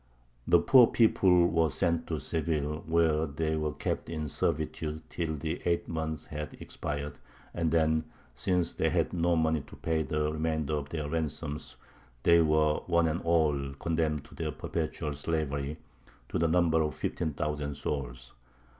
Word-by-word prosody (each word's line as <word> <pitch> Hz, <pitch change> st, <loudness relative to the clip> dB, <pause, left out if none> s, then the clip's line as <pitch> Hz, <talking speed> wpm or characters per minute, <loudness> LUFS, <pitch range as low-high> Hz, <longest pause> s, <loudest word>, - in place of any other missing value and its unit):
The -, -, +7 dB
poor 125 Hz, -3 st, +7 dB
people 95 Hz, -6 st, +4 dB
were 80 Hz, -1 st, +2 dB
sent 85 Hz, -1 st, 0 dB
to 80 Hz, -2 st, -2 dB
Seville, 75 Hz, 0 st, -1 dB
where 80 Hz, -1 st, +2 dB
they 80 Hz, +2 st, -1 dB
were 75 Hz, -1 st, -1 dB
kept 70 Hz, 0 st, -3 dB
in 80 Hz, -2 st, -3 dB
servitude 80 Hz, +1 st, -2 dB
till 80 Hz, -2 st, -2 dB
the 80 Hz, +2 st, -4 dB
eight 85 Hz, -1 st, 0 dB
months 80 Hz, -1 st, -3 dB
had 75 Hz, 0 st, -6 dB
expired, 70 Hz, 0 st, -5 dB, 0.3 s
and 85 Hz, -2 st, 0 dB
then, 80 Hz, -1 st, +2 dB, 0.3 s
since 90 Hz, +7 st, 0 dB
they -, -, +1 dB
had -, -, 0 dB
no 85 Hz, 0 st, +2 dB
money 80 Hz, -1 st, +2 dB
to 75 Hz, -, -13 dB
pay 80 Hz, -1 st, -1 dB
the 75 Hz, -1 st, -1 dB
remainder 80 Hz, -1 st, -1 dB
of 75 Hz, -1 st, -2 dB
their 75 Hz, -2 st, -3 dB
ransoms, 75 Hz, -1 st, -3 dB, 0.5 s
they 85 Hz, 0 st, +6 dB
were 75 Hz, -1 st, +3 dB
one 85 Hz, -1 st, +3 dB
and 80 Hz, +3 st, -1 dB
all 75 Hz, -5 st, +1 dB
condemned 80 Hz, -1 st, -1 dB
to -, -, -4 dB
perpetual 75 Hz, -1 st, -3 dB
slavery, 75 Hz, -1 st, -2 dB, 0.5 s
to -, -, -1 dB
the 85 Hz, -, +3 dB
number 80 Hz, -1 st, +3 dB
of 75 Hz, -3 st, -1 dB
fifteen 80 Hz, -3 st, -2 dB
thousand 75 Hz, 0 st, -2 dB
souls. 65 Hz, -4 st, -4 dB
80 Hz, 155 wpm, -30 LUFS, 75-80 Hz, 0.5 s, The